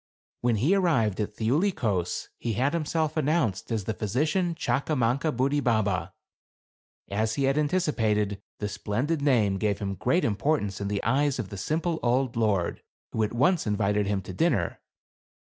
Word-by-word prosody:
When 120 Hz, -1 st, +2 dB
he 135 Hz, -, +2 dB
arrived 155 Hz, -, +2 dB
at 105 Hz, 0 st, -2 dB
Thiuli 145 Hz, -, +2 dB
Kos, 95 Hz, -7 st, -1 dB
he 115 Hz, -, -2 dB
had 130 Hz, +8 st, +1 dB
himself 160 Hz, -1 st, -1 dB
announced 150 Hz, -, 0 dB
as 110 Hz, -3 st, 0 dB
the 110 Hz, -, -2 dB
Physician 155 Hz, -, 0 dB
Chakamankabudi 140 Hz, -1 st, 0 dB
baba. 100 Hz, -6 st, 0 dB, 1.0 s
As 110 Hz, +2 st, 0 dB
he 140 Hz, -, 0 dB
had 135 Hz, +1 st, +2 dB
anticipated, 110 Hz, -, +1 dB, 0.2 s
the 105 Hz, -, -3 dB
splendid 110 Hz, +9 st, -2 dB
name 110 Hz, -9 st, +2 dB
gave 105 Hz, -1 st, +1 dB
him 100 Hz, -1 st, -3 dB
great 170 Hz, -, +1 dB
importance 105 Hz, -2 st, 0 dB
in 100 Hz, -, -2 dB
the 100 Hz, 0 st, -2 dB
eyes 140 Hz, +4 st, +2 dB
of 110 Hz, -6 st, -4 dB
the 100 Hz, -, -7 dB
simple 160 Hz, -, -1 dB
old 125 Hz, +1 st, +1 dB
lord, 105 Hz, -6 st, 0 dB, 0.3 s
who 110 Hz, -, -1 dB
at 105 Hz, -, +1 dB
once 150 Hz, +5 st, +2 dB
invited 105 Hz, 0 st, +1 dB
him 100 Hz, -2 st, -1 dB
to 95 Hz, -, -7 dB
dinner. 90 Hz, -, +1 dB
115 Hz, 160 wpm, -27 LUFS, 105-150 Hz, 1.0 s, When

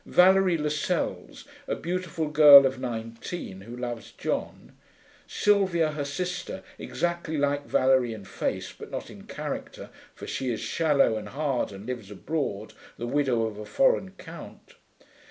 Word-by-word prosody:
Valerie 185 Hz, -1 st, +5 dB
Lascelles, 150 Hz, -1 st, -2 dB, 0.2 s
a -, -, -1 dB
beautiful 175 Hz, -2 st, -3 dB
girl 150 Hz, -2 st, +9 dB
of 130 Hz, -1 st, -1 dB
nineteen, 115 Hz, -, -6 dB
who 115 Hz, +5 st, -9 dB
loves 120 Hz, -3 st, -5 dB
John. -, -, -4 dB, 0.6 s
Sylvia, 190 Hz, -6 st, +2 dB
her 150 Hz, -1 st, -3 dB
sister, 180 Hz, +5 st, -4 dB, 0.2 s
exactly 170 Hz, -2 st, -2 dB
like 145 Hz, 0 st, 0 dB
Valerie 130 Hz, -2 st, +3 dB
in 110 Hz, -3 st, -8 dB
face, -, -, -3 dB
but -, -, -11 dB
not -, -, -6 dB
in -, -, -13 dB
character, -, -, -6 dB, 0.2 s
for -, -, -9 dB
she 130 Hz, -, -3 dB
is 115 Hz, -, -3 dB
shallow 145 Hz, -8 st, +2 dB
and 110 Hz, -, -6 dB
hard 140 Hz, -5 st, -1 dB
and 100 Hz, +1 st, -10 dB
lives 120 Hz, -5 st, -5 dB
abroad, 110 Hz, -2 st, -3 dB, 0.2 s
the 120 Hz, -, -4 dB
widow 130 Hz, -3 st, +1 dB
of 110 Hz, -2 st, -4 dB
a 105 Hz, -, -6 dB
foreign 255 Hz, -, +2 dB
count. 165 Hz, -3 st, -11 dB
145 Hz, 145 wpm, -27 LUFS, 120-170 Hz, 0.6 s, girl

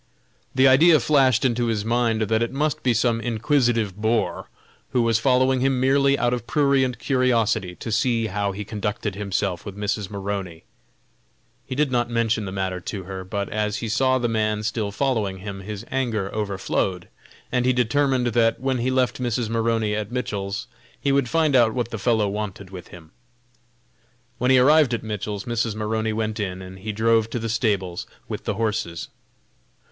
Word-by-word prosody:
The 130 Hz, +1 st, +6 dB
idea 155 Hz, +5 st, +6 dB
flashed 135 Hz, -4 st, +3 dB
into 120 Hz, -1 st, +1 dB
his 110 Hz, -2 st, -1 dB
mind 115 Hz, -1 st, +1 dB
that 110 Hz, +1 st, +1 dB
it 115 Hz, -, 0 dB
must 150 Hz, +2 st, -1 dB
be 125 Hz, -, +2 dB
some 115 Hz, 0 st, +1 dB
inquisitive 115 Hz, -3 st, +1 dB
boor, 110 Hz, +2 st, -1 dB, 0.4 s
who 125 Hz, -, +3 dB
was 115 Hz, 0 st, +2 dB
following 130 Hz, +1 st, +3 dB
him 135 Hz, 0 st, +1 dB
merely 140 Hz, +1 st, +3 dB
out 120 Hz, -1 st, +1 dB
of 120 Hz, -1 st, -4 dB
prurient 140 Hz, -4 st, +2 dB
curiosity 115 Hz, -8 st, +1 dB
to 110 Hz, -, -6 dB
see 115 Hz, +1 st, +1 dB
how 100 Hz, -1 st, -1 dB
he 100 Hz, +2 st, -6 dB
conducted 105 Hz, 0 st, -3 dB
himself 100 Hz, -2 st, -2 dB
with 100 Hz, -1 st, -8 dB
Mrs. 105 Hz, -1 st, -2 dB
Maroney. 100 Hz, -4 st, -5 dB, 1.0 s
He 130 Hz, -, -4 dB
did 145 Hz, -1 st, +1 dB
not 120 Hz, -1 st, +1 dB
mention 115 Hz, -2 st, 0 dB
the 95 Hz, -, -5 dB
matter 95 Hz, -1 st, -2 dB
to 95 Hz, +2 st, -6 dB
her, 95 Hz, 0 st, -6 dB
but 100 Hz, +1 st, -3 dB
as 105 Hz, -1 st, -1 dB
he 115 Hz, -, -4 dB
saw 130 Hz, +4 st, +2 dB
the 120 Hz, -1 st, 0 dB
man 110 Hz, -2 st, 0 dB
still 105 Hz, -1 st, -1 dB
following 105 Hz, -4 st, -1 dB
him 100 Hz, +1 st, -7 dB
his 105 Hz, +2 st, -7 dB
anger 115 Hz, -7 st, -1 dB
overflowed, 95 Hz, -3 st, -2 dB, 0.4 s
and 125 Hz, -1 st, +1 dB
he 130 Hz, -, +3 dB
determined 130 Hz, +1 st, +1 dB
that 115 Hz, -1 st, +2 dB
when 130 Hz, 0 st, -1 dB
he 125 Hz, +2 st, 0 dB
left 130 Hz, 0 st, 0 dB
Mrs. 120 Hz, -2 st, -1 dB
Maroney 115 Hz, -2 st, 0 dB
at 105 Hz, +1 st, -4 dB
Mitchell's, 100 Hz, -5 st, -3 dB, 0.3 s
he 140 Hz, -, 0 dB
would 135 Hz, -3 st, +2 dB
find 160 Hz, -4 st, +2 dB
out 120 Hz, -2 st, +4 dB
what 120 Hz, -2 st, -2 dB
the 115 Hz, -, -4 dB
fellow 110 Hz, 0 st, +2 dB
wanted 100 Hz, -2 st, -5 dB
with 90 Hz, -2 st, -9 dB
him. 80 Hz, -2 st, -14 dB, 1.3 s
When 125 Hz, +1 st, +1 dB
he 130 Hz, -, +6 dB
arrived 140 Hz, -1 st, +5 dB
at -, -, -6 dB
Mitchell's 105 Hz, -2 st, -4 dB
Mrs. 115 Hz, -2 st, -1 dB
Maroney 110 Hz, +1 st, -1 dB
went 110 Hz, 0 st, -2 dB
in, 95 Hz, -3 st, -3 dB
and 95 Hz, 0 st, -10 dB
he 105 Hz, +3 st, -4 dB
drove 110 Hz, +1 st, +2 dB
to 120 Hz, -, -3 dB
the 115 Hz, -1 st, -3 dB
stables 100 Hz, -6 st, -1 dB, 0.2 s
with -, -, -6 dB
the -, -, -1 dB
horses. 105 Hz, -7 st, -2 dB
115 Hz, 180 wpm, -23 LUFS, 105-125 Hz, 1.3 s, The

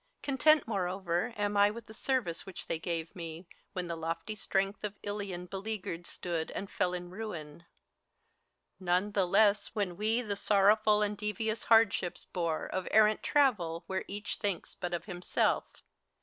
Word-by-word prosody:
Content, 300 Hz, +2 st, +4 dB
moreover, 185 Hz, 0 st, -1 dB
am 205 Hz, 0 st, 0 dB
I 205 Hz, 0 st, +6 dB
with 225 Hz, +2 st, -7 dB
the 220 Hz, -, -12 dB
service 225 Hz, -8 st, -1 dB
which 190 Hz, -, -8 dB
They 160 Hz, -, -2 dB
g^ve 165 Hz, -1 st, -3 dB
me, 165 Hz, 0 st, -7 dB, 0.3 s
when 180 Hz, -2 st, -2 dB
the 170 Hz, -1 st, -3 dB
lofty 165 Hz, +5 st, -3 dB
strength 195 Hz, -1 st, -1 dB
of 210 Hz, -1 st, -4 dB
Ilion 200 Hz, -3 st, -4 dB
Beleaguered 195 Hz, -2 st, -5 dB
stood, 170 Hz, -3 st, -3 dB
and 195 Hz, -, -5 dB
fell 180 Hz, 0 st, 0 dB
in 175 Hz, 0 st, -6 dB
ruin: 170 Hz, -6 st, -7 dB, 1.1 s
none 185 Hz, +2 st, +1 dB
the 195 Hz, -3 st, +2 dB
less 205 Hz, +3 st, +3 dB
When 190 Hz, -5 st, -1 dB
we 220 Hz, +4 st, +1 dB
the 205 Hz, -3 st, -2 dB
so 200 Hz, +1 st, +1 dB
rr 195 Hz, +1 st, +7 dB
ow -, -, +6 dB
fu 220 Hz, 0 st, -2 dB
l 210 Hz, 0 st, +5 dB
and 210 Hz, 0 st, -1 dB
devious 215 Hz, +2 st, -2 dB
hardships 225 Hz, -6 st, +3 dB
bore 170 Hz, -3 st, -2 dB
Of 185 Hz, -1 st, -3 dB
errant 215 Hz, 0 st, +5 dB
travel, 200 Hz, -, +2 dB
where 190 Hz, 0 st, -2 dB
each 205 Hz, +2 st, -3 dB
thinks 200 Hz, -5 st, -2 dB
but 175 Hz, -1 st, -3 dB
of 170 Hz, -, -5 dB
himself. 180 Hz, -3 st, -1 dB
195 Hz, 175 wpm, -31 LUFS, 175-215 Hz, 1.1 s, rr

